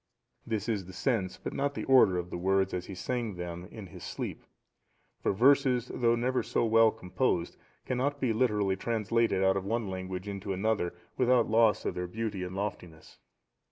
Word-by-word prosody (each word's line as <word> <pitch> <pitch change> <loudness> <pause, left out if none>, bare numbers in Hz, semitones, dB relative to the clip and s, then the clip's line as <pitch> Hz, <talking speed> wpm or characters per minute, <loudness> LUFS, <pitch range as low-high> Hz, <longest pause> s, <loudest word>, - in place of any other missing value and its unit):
This 110 -1 -2
is 100 -6 -1
the 95 - -10
sense 95 -1 -1
but - - -6
not 140 +1 -1
the - - -3
order 125 -9 +5
of 90 0 -4
the - - -3
words 95 +1 +1
as 90 0 -3
he 95 - -7
sang 115 +1 -3
them 90 0 -6
in 110 -3 -9
his 85 - -11
sleep; - - -5 0.8
for - - +1
verses, 125 +2 +3
though 120 -1 +2
never 125 +2 0
so - - 0
well 115 0 +5
composed, 90 -3 -1 0.3
cannot 140 +3 -1
be 125 -4 +1
literally 105 -5 +1
translated 115 -1 0
out 95 0 +3
of 95 - -2
one 115 +2 -1
language 95 0 -5
into 100 -1 -4
another 95 -3 0 0.2
without 125 -3 +3
loss 110 -1 +4
of - - -1
their 90 0 -3
beauty 105 0 -4
and 90 0 -5
loftiness. 90 -5 -6
105 Hz, 185 wpm, -30 LUFS, 95-115 Hz, 0.8 s, order